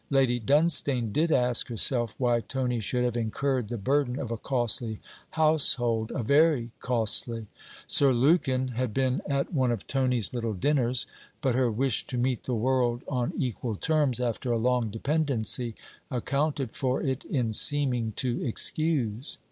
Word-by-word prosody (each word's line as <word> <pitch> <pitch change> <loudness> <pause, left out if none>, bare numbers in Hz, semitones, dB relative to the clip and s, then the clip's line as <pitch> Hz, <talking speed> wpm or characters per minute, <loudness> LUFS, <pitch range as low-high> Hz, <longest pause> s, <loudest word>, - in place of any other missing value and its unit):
Lady 130 -3 +2
Dunstane 140 -3 +2
did 160 +2 +1
ask 125 -4 +1
herself 120 -1 +2
why 120 -2 +2
Tony 125 -1 -2
should 125 +4 -1
have 120 -1 -1
incurred 120 +2 -1
the 120 - -4
burden 130 +3 0
of 125 -5 -5
a - - -1
costly 120 -3 -1 0.3
household 130 -8 +1
a 125 - -2
very 140 -2 +3
costly: 115 -1 0 0.4
Sir 140 -2 +4
Lukin 130 0 +2
had 120 -2 -3
been 130 -1 0
at 140 +4 -1
one 130 -5 +2
of 115 -5 -3
Tony's 130 -5 0
little' 115 -3 -2
dinners: 125 +2 +1 0.3
but 135 -4 0
her 125 0 +2
wish 120 +2 -1
to 125 - -4
meet 125 0 -1
the 125 - -1
world 120 0 0
on 125 -3 -1
equal 120 -3 -3
terms, 150 0 +1
after 120 0 -2
a 120 - +1
long 125 0 +1
dependency, 120 -2 0 0.3
accounted 140 0 -1
for 130 +1 -2
it 130 -1 -2
in 120 -6 -1
seeming 125 -3 +2
to 125 +2 -2
excuse. 135 -2 -1
125 Hz, 155 wpm, -27 LUFS, 115-135 Hz, 0.4 s, Sir